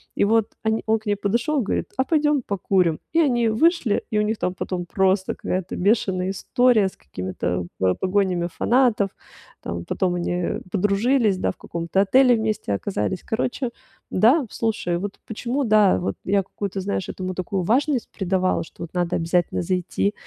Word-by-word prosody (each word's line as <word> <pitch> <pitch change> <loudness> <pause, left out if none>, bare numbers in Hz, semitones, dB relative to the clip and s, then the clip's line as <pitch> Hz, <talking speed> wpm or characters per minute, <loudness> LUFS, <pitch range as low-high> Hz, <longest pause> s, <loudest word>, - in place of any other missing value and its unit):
И - - +2
вот 220 0 +2
они 220 0 0
он 220 0 +3
к 220 - -26
ней 205 -1 +1
подошёл, 235 +9 0
говорит: 205 - -2
"А 260 - +3
пойдём 295 -1 +2
покурим!" 185 -6 +1
И 330 - +3
они 240 -6 +2
вышли, 270 - +2
и 215 - -1
у - - +4
них 215 +1 0
там 180 - -1
потом 180 -1 -3
просто 190 +1 +1
какая-то 185 0 -3
бешеная 190 -2 +1
история 240 0 +3
с - - -21
какими-то 90 +3 -4
по 95 -1 +3
погонями 185 -2 0
фанатов. 230 -1 +2 0.5
Там 85 0 -5
потом 180 -2 0
они, 175 0 -2
э, 175 0 -1
подружились, 210 +2 +2
да, - - 0
в - - -15
каком-то 170 +3 -1
отеле 250 +5 +5
вместе 215 - -1
оказались. 190 - -2
Короче, 245 +3 -2 0.4
да, 250 - +4
слушай, 210 -6 -1
вот 200 +2 -5
почему, 240 +5 -2
да, 215 -4 +4
вот 180 - -2
я 200 +1 +2
какую-то, 195 0 -5
знаешь, 190 -1 -2
этому 185 0 -4
такую 185 +1 -2
важность 260 - +1
придавала, 185 -2 0
что 165 - -11
вот 170 - -9
надо 175 0 0
обязательно 175 +1 0
зайти, 185 +3 -1
200 Hz, 170 wpm, -23 LUFS, 180-225 Hz, 0.5 s, отеле